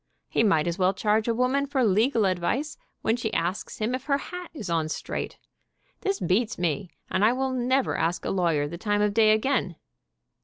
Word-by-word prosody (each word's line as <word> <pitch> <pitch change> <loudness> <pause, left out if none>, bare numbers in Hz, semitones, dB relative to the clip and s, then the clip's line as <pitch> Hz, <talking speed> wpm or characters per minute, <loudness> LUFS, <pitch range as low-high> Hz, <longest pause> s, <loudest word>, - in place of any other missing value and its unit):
He - - +1
might 180 -9 +3
as 170 +2 -2
well 185 +1 +3
charge 215 +2 +1
a 230 - +2
woman 260 +4 +1
for 270 -2 +1
legal 220 +2 +3
advice 190 - -1 0.3
when 225 - +2
she 230 -2 -3
asks 175 +4 -2
him 220 +3 -1
if 255 +1 -3
her 280 -2 +2
hat 360 +4 -7
is 225 - -7
on 165 -2 0
straight. - - -4 0.6
This 395 0 -1
beats 215 +5 +1
me, 175 +2 -1 0.2
and 190 - +1
I 225 +3 +5
never 260 0 0
will - - -2
ask 170 +2 -1
a - - -1
lawyer 165 -6 +1
the 170 +3 -7
time 205 0 +1
of 210 -1 +1
day, 215 0 +5
again. 215 -5 +1
215 Hz, 200 wpm, -26 LUFS, 180-255 Hz, 0.6 s, I